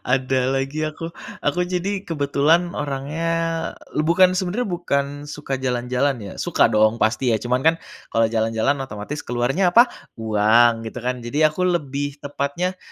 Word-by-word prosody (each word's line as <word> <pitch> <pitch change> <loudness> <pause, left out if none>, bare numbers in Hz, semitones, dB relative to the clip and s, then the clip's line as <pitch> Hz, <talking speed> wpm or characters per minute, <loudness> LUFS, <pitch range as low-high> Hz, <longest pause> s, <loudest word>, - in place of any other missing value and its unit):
Ada 130 0 0
lagi 135 +3 -1
aku, 165 +2 -5 0.3
aku 145 +5 0
jadi 190 +2 -2
kebetulan 155 +3 +2
orangnya, 145 +4 -3 0.6
e - - -4
bukan 185 +2 +4
sebenarnya 195 +6 -1
bukan 155 -6 0 0.2
suka 145 -2 -4
jalan-jalan 125 +1 0
ya 100 - -7
suka - - +2
dong 110 +2 +2
pasti 115 +2 +2
ya, 110 - -1
cuman 125 +1 0
kan 160 - +5 0.4
kalau 115 -1 +3
jalan-jalan 115 +4 +1
otomatis 135 +2 -6
keluarnya 135 +10 +1
apa? 240 +4 +7 0.3
Uang 115 +2 +3
gitu 120 +2 -6
kan. 125 +1 -2
Jadi 145 +6 -1
ya 155 - +6
aku 180 +4 -1
lebih 145 -4 -2
tepatnya 145 +6 -2
140 Hz, 155 wpm, -22 LUFS, 120-165 Hz, 0.6 s, apa